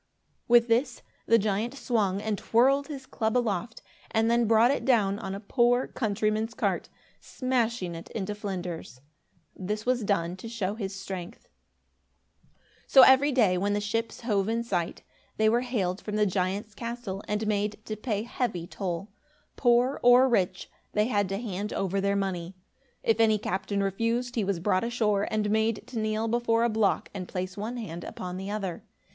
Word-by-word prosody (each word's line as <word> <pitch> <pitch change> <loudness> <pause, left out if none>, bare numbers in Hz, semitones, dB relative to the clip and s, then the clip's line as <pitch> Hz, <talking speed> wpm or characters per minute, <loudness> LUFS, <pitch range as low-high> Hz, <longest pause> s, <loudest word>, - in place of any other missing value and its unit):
With 240 0 +6
this, 235 +4 +1 0.2
the 230 - +6
giant 215 +4 -1
swung 210 -7 0
and 220 -1 0
twirled 270 +7 +3
his 275 -4 -7
club 220 -2 -1
aloft 225 -2 -2 0.3
and 225 +1 +2
then 235 -1 +3
brought 225 +3 +5
it 280 - -1
down 205 -6 +2
on 195 -3 -4
a - - -5
poor 245 +3 +2
countryman's 215 0 -1
cart, - - -1 0.3
smashing 235 -8 -1
it 165 0 -9
into 210 -1 -3
flinders. 180 - -6 0.5
This 210 +3 -4
was 250 -2 +1
done 180 -3 0
to 225 +4 -8
show 205 -4 -2
his 200 -3 -5
strength. 190 -2 -7 1.4
So 265 - +8
every 265 +3 +6
day, 210 -9 +3
when 205 +2 0
the 205 - +1
ships 225 +3 -3
hove 210 -4 0
in 230 +1 0
sight, 175 -7 -2 0.3
they 220 - +3
were 235 +2 +3
hailed 210 -7 -2
from 210 - -5
the 210 0 +3
giant's 195 +3 -1
castle 230 -4 -5
and 210 +1 -1
made 210 0 -1
to 215 - -4
pay 215 -1 -2
heavy 225 -7 -2
toll. 190 +1 -4 0.4
Poor 245 +2 +3
or 245 +2 +7
rich, 185 -7 0 0.3
they 210 0 +3
had 205 -4 +1
to 195 - -2
hand 210 -2 -4
over 195 0 -1
their 200 0 +1
money. 185 -2 -2 0.5
If 225 0 +2
any 220 -1 +5
captain 195 0 -2
refused, 230 +5 -1
he 225 - 0
was 195 -3 -1
brought 185 +1 +1
ashore 215 -4 +1
and 210 -1 0
made 220 0 +1
to 235 - -5
kneel 215 +1 -1
before 230 0 +1
a 235 - +3
block 215 -2 +1
and 185 -3 -5
place 185 0 -4
one 220 +4 -4
hand 175 -7 -6
upon 180 0 -6
the 190 +1 -5
other. 200 -4 -4
215 Hz, 175 wpm, -28 LUFS, 195-235 Hz, 1.4 s, So